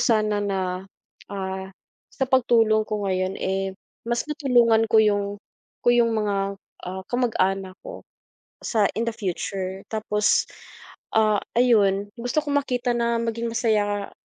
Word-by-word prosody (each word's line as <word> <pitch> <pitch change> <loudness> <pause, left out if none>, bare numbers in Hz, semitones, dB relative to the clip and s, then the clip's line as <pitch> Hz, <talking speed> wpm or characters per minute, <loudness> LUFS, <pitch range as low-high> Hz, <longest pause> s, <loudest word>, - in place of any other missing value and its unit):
sana 215 -3 +2
na, 190 -1 -2 0.5
ah, 190 -1 -4 0.4
sa 265 - -1
pagtulong 225 -4 +3
ko 210 -1 -2
ngayon, 185 0 -1
eh, 190 0 -1 0.4
mas 235 0 0
natulungan 240 -6 +3
ko 220 - +3
yung 205 -1 +1 0.5
ko - - +3
yung 235 -1 +3
mga 200 -2 -1 0.3
ah, 190 +1 -5
kamag-anak 195 -6 0
ko - - -8 0.6
sa 220 -3 +1 0.2
in - - +1
the 230 - -2
future. 190 -1 -3
Tapos, 210 -1 +2 0.7
ah, 215 -2 +4 0.2
ayun, 205 -5 +4
gusto 245 +5 0
kong 285 -1 +1
makita 245 -2 -1
na 235 0 +1
maging 230 0 -2
masaya 210 -3 0
215 Hz, 130 wpm, -24 LUFS, 195-235 Hz, 0.7 s, ah